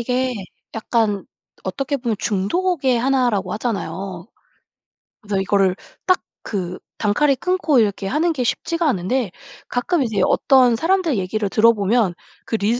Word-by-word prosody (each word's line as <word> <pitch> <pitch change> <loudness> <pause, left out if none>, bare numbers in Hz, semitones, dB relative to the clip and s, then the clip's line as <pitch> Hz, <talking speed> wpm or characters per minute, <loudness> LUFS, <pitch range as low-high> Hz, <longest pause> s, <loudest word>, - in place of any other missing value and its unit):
이게 250 +2 0 0.4
약간 220 -3 0 0.4
어떻게 275 +1 -2
보면 240 -4 -2
중독의 260 - +1
1 260 0 +2
라고 195 -4 -2
하잖아요. 195 -5 -4 1.0
그래서 200 -3 -1
이거를 195 -1 +2 0.3
딱 370 - +3 0.2
그 185 -4 -4 0.2
단칼에 270 +7 +2
끊고 315 -3 +2
이렇게 200 -3 0
하는 315 - +1
게 275 -6 -1
쉽지가 335 +6 0
않은데 220 +2 0 0.4
가끔 295 +7 0
이제 220 -5 -1
어떤 255 -3 +4
사람들 335 - +1
얘기를 200 +3 -1
들어보면 215 -3 +3 0.3
그 - - -2
릴 220 +3 +1
230 Hz, 285 characters per minute, -21 LUFS, 200-270 Hz, 1.0 s, 어떤